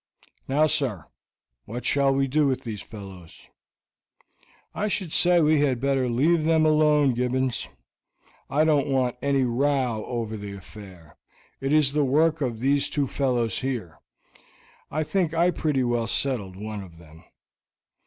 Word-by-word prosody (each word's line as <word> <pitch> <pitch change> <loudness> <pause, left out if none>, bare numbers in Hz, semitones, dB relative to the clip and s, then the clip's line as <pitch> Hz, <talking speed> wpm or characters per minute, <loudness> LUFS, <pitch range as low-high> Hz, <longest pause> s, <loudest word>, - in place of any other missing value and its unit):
"Now 145 +3 +3
sir, 130 - 0 0.6
what 120 +3 -7
shall 140 -1 +2
we 135 0 +1
do 150 +2 +2
with 130 -2 -1
these 110 -4 -6
fellows?" 95 -6 -12 1.2
"I 210 - -2
should 190 -5 -3
say 175 0 +5
we 155 -1 +3
had 135 -4 +1
better 135 -1 0
leave 155 +7 +2
them 160 0 +3
alone, 150 -3 +3
Gibbons. 125 +1 -1 0.8
I 150 +3 +2
don't 150 -3 +2
want 130 -3 0
any 140 -1 +1
row 125 -2 0
over 115 -3 -4
the 100 -1 -7
affair. 95 -4 -13 0.4
It 135 +1 -2
is 150 -3 +4
the 150 -1 +2
work 155 +4 +2
of 120 -5 -2
these 140 +2 +2
two 145 -2 0
fellows 120 -6 -1
here. 120 -11 -4 0.9
I 155 +1 -1
think 170 0 -1
I 175 +2 +3
pretty 150 -6 0
well 120 -2 0
settled 110 -7 -2
one 105 +1 -6
of 85 -4 -13
them." 80 -1 -16
135 Hz, 150 wpm, -25 LUFS, 115-150 Hz, 1.2 s, say